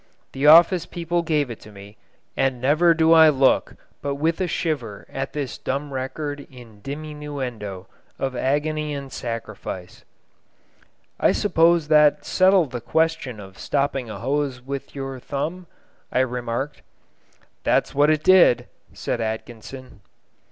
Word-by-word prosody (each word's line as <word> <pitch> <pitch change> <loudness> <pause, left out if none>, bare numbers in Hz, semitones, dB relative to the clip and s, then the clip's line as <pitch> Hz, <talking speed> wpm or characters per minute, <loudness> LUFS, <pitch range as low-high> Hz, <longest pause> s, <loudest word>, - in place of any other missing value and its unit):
The 135 +2 +1
office 170 +3 +7
people 170 0 -2
gave 150 -6 0
it 115 - -8
to 105 - -14
me, 100 +1 -13 0.4
and 135 -2 0
never 155 +6 +4
do 160 0 +4
I 160 -1 +8
look 135 -2 +2 0.3
but 140 -1 -2
with 160 +5 0
a 185 - +1
shiver 140 - -3
at 135 0 -4
this 145 -4 -4
dumb 140 +1 -3
record 145 +2 -4
in 115 -5 -15
diminuendo 140 -9 -6 0.3
of 135 -1 -3
agony 150 +3 -1
and 140 -1 -7
sacrifice. 110 -6 -6 1.2
"I - - +4
suppose 170 -4 +3
that 150 -1 +4
settled 185 -6 +3
the 120 -2 -5
question 160 -6 0
of 95 -1 -12
stopping 140 -4 -1
a 110 - -6
hose 135 0 -1
with 135 +3 -7
your 135 -1 -5
thumb?" 165 +8 -4 0.4
I 130 - +2
remarked. 125 +2 -3 0.8
"That's - - +1
what 145 +2 +4
it 155 -1 +1
did!" 185 -9 +5 0.3
said 120 - -3
Atkinson. 115 +2 -7
140 Hz, 135 wpm, -23 LUFS, 125-155 Hz, 1.2 s, I